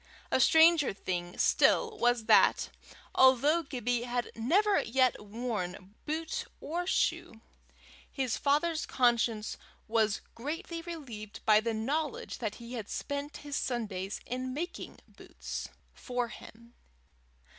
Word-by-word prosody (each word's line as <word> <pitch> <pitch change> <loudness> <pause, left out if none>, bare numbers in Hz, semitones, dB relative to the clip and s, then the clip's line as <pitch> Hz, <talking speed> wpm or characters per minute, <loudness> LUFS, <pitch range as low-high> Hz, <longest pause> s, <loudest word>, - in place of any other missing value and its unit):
A - - +3
stranger 320 -1 +6
thing 175 -2 -4
still 450 -2 +3
was, 240 -2 +2
that, - - +5 0.4
although 265 +5 +5
Gibbie 245 -5 -2
had 245 -1 -2
never 375 - +3
yet 255 -1 +1
worn 205 -4 -5
boot 315 +1 -2
or 350 +4 -3
shoe, 225 -10 0 0.7
his 260 -4 -1
father's 310 +3 +1
conscience 235 -3 +1 0.3
was 220 -2 +1
greatly 330 - -5
relieved 265 - -8
by 215 -1 +6
the 225 0 -2
knowledge 285 +6 -2
that 215 -3 -3
he 235 0 -6
spent 285 +1 -4
his 290 -1 -4
Sundays 205 -6 -3
in 255 +1 -4
making 345 +5 -6
boots - - -7 0.2
for 245 -2 -3
him. 235 +1 -13
245 Hz, 115 wpm, -31 LUFS, 225-300 Hz, 0.7 s, stranger